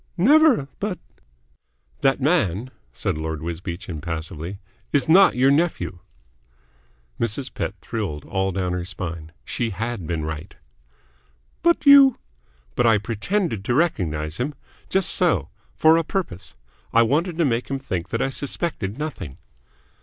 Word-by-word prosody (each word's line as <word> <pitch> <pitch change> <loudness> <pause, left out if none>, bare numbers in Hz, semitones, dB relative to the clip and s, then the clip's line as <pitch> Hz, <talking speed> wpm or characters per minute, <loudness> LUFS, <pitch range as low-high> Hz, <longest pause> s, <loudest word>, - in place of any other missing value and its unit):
"Never. 270 - +5
But 200 -3 -2 0.5
" - - -40
"That 135 - +3
man," 130 - +1 0.2
said 60 +5 -3
Lord 80 -1 -4
Wisbeach 85 +2 -5
impassively, 80 +2 -5 0.3
"is 145 - +2
not 190 +4 +6
your 130 +2 +4
nephew." 155 - 0 1.2
Mrs. 115 +4 -2
Pett 100 - -3
thrilled 100 -11 -4
all 95 0 -1
down 90 -1 -1
her 90 -1 -2
spine. 85 -3 -6
She 120 -2 -2
had 110 -3 -4
been 80 -3 -2
right. 80 +4 -6 1.1
"But 340 -2 +2
you 280 -2 +8 0.3
" - - -36
"But 120 - +3
I 115 -1 +5
pretended 115 - -2
to 120 - +1
recognise 80 - 0
him? 140 +4 -2 0.3
Just 190 0 +2
so. 180 -3 +2 0.3
For 160 +1 +5
a 165 - +1
purpose. 100 - -4 0.4
I 115 - +5
wanted 160 +8 0
to 170 - +3
make 120 -2 0
him 135 - -1
think 95 -10 -4
that 115 - 0
I 135 - -1
suspected 135 - -3
nothing." 145 - -5
115 Hz, 145 wpm, -23 LUFS, -, 1.2 s, you